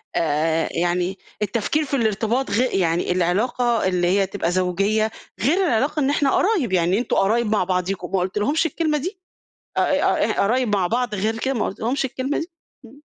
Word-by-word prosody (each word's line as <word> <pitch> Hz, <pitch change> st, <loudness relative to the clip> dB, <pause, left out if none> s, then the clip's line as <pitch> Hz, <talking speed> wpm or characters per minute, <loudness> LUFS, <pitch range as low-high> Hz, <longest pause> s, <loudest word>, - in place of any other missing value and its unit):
آآ 160 Hz, 0 st, +1 dB
يعني 175 Hz, +2 st, -1 dB, 0.2 s
التفكير 230 Hz, +9 st, 0 dB
في 280 Hz, -, -2 dB
الارتباط 225 Hz, +1 st, 0 dB
غي 230 Hz, +6 st, +2 dB
يعني 170 Hz, -1 st, +1 dB
العلاقة 225 Hz, +7 st, +1 dB
اللي 180 Hz, -1 st, +1 dB
هي 195 Hz, +2 st, +3 dB
تبقى 180 Hz, -3 st, -2 dB
زوجيّة، 195 Hz, +4 st, +1 dB, 0.3 s
غير 290 Hz, +10 st, +2 dB
العلاقة 285 Hz, +4 st, +1 dB
إن 275 Hz, -2 st, +2 dB
إحنا 285 Hz, -1 st, +2 dB
قرايب، 355 Hz, -, +1 dB
يعني 180 Hz, +1 st, +2 dB
أنتم 245 Hz, -, -1 dB
قرايب 225 Hz, +5 st, +2 dB
مع 210 Hz, -, +2 dB
بعضيكم، 180 Hz, 0 st, -2 dB
ما 195 Hz, -, +1 dB
قُلتلهُمش 210 Hz, -, 0 dB
الكلمة 310 Hz, 0 st, 0 dB
دي؟ 365 Hz, +6 st, -5 dB, 0.6 s
ق -, -, +4 dB
ق -, -, +1 dB
قرايب 225 Hz, +1 st, +2 dB
مع 185 Hz, -3 st, +1 dB
بعض 240 Hz, +1 st, -1 dB
غير 215 Hz, +3 st, -1 dB
كده 265 Hz, +3 st, -1 dB
ما 235 Hz, -, -1 dB
قُلتلهُمش 245 Hz, +8 st, -2 dB
الكلمة 265 Hz, +2 st, -3 dB
دي؟ 335 Hz, +2 st, -6 dB, 0.3 s
إمم. 275 Hz, +6 st, -16 dB
215 Hz, 175 wpm, -22 LUFS, 185-265 Hz, 0.6 s, ق